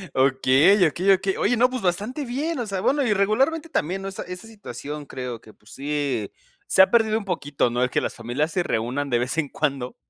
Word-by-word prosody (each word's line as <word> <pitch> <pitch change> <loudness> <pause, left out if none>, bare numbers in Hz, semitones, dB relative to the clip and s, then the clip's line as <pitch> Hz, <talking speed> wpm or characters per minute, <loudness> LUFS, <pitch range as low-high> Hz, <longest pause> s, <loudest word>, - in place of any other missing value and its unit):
Okey, 135 +8 +4
okey, 180 +6 +2
okey. 190 0 0
Oye, 245 +3 +1
no, 250 +2 +4
pues, 255 -1 -4
bastante 210 - -2
bien. 285 +6 -2
O 240 - -2
sea, 195 -2 -3
bueno, 280 +7 +2
y 230 -5 +2
regularmente, 265 +12 +1
también, 190 - -1
¿no?, 195 - -5
esa 195 - -6
esa 180 +5 -8
situación 150 - -8
creo 125 -4 -6
que, 110 - -16
pues, 105 - -20
sí 140 -6 -2 0.4
se - - +5
ha 190 - +6
perdido 220 -2 +3
un 210 - -10
poquito, 145 -8 -1
¿no?, 120 +1 0
el 125 - +1
que - - 0
las - - -3
familias 125 +7 -2
se 180 - 0
reúnan 125 +3 -2
de 120 -2 +2
vez 125 +6 -2
en 150 -4 0
cuando, 135 -4 -2
175 Hz, 225 wpm, -24 LUFS, 130-215 Hz, 0.4 s, ha